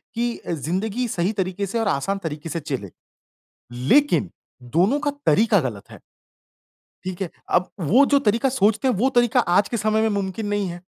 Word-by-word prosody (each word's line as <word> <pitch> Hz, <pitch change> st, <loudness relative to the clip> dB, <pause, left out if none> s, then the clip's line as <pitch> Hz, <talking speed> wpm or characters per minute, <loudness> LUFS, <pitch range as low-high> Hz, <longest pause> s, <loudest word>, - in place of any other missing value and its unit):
कि 235 Hz, +1 st, -2 dB
ज़िंदगी 190 Hz, -, -2 dB
सही 180 Hz, -2 st, -1 dB
तरीके 190 Hz, +2 st, -3 dB
से 230 Hz, +5 st, -2 dB
और 225 Hz, -, 0 dB
आसान 195 Hz, +4 st, 0 dB
तरीके 155 Hz, 0 st, -5 dB
से 165 Hz, -, -3 dB
चले, 135 Hz, -, -5 dB, 0.8 s
लेकिन 185 Hz, -, +2 dB, 0.5 s
दोनों 210 Hz, +12 st, +3 dB
का 290 Hz, 0 st, -1 dB
तरीका 210 Hz, +6 st, +4 dB
ग़लत 110 Hz, -7 st, -6 dB
है। -, -, -12 dB, 1.0 s
ठीक 185 Hz, 0 st, -6 dB
है? 185 Hz, -, -2 dB, 0.2 s
अब 180 Hz, +1 st, +1 dB
वो 210 Hz, -, +4 dB
जो 280 Hz, 0 st, +3 dB
तरीका 230 Hz, +6 st, +3 dB
सोचते 225 Hz, +1 st, +1 dB
हैं 255 Hz, -, +2 dB
वो 245 Hz, +8 st, +2 dB
तरीका 240 Hz, 0 st, +4 dB
आज 195 Hz, -2 st, +2 dB
के 235 Hz, -, -2 dB
समय 215 Hz, +1 st, +1 dB
में 220 Hz, -, +2 dB
मुमकिन 200 Hz, +1 st, -3 dB
नहीं 205 Hz, -1 st, -1 dB
है 175 Hz, 0 st, -7 dB
200 Hz, 180 wpm, -22 LUFS, 175-230 Hz, 1.0 s, तरीका